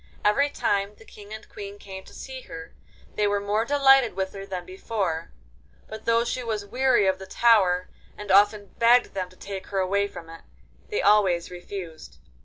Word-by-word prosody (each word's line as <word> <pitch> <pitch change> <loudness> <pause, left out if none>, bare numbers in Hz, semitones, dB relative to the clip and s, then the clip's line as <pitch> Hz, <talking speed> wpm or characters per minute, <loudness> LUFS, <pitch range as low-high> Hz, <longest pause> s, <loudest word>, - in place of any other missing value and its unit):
Every 280 +8 +3
time 200 -6 -1
the 225 - -18
King 205 -1 -14
and 220 0 -8
Queen 200 0 -9
came 190 -1 -9
to - - -15
see 260 -1 -8
her 165 0 -9 0.4
they 210 - +1
were 205 0 +1
more 205 +2 0
delighted 270 -5 +4
with 190 0 -3
her 195 0 -8
than 185 -2 -5
before, 185 -3 -3 0.6
but 220 0 -9
though 230 0 +3
she 250 +1 -3
was 215 -3 -3
weary 255 -1 +2
of 190 0 +1
the 190 - -9
tower, 190 -5 +3 0.3
and 210 -1 -5
often 205 0 +4
begged 240 +1 +4
them 185 -2 -3
to 185 - -19
take 195 -1 -7
her 195 - -4
away 200 +2 +1
from 165 -4 -11
it, 165 0 -11 0.5
they 420 - -1
always 190 -5 +3
refused. 175 -2 -8
200 Hz, 190 wpm, -25 LUFS, 190-225 Hz, 0.6 s, delighted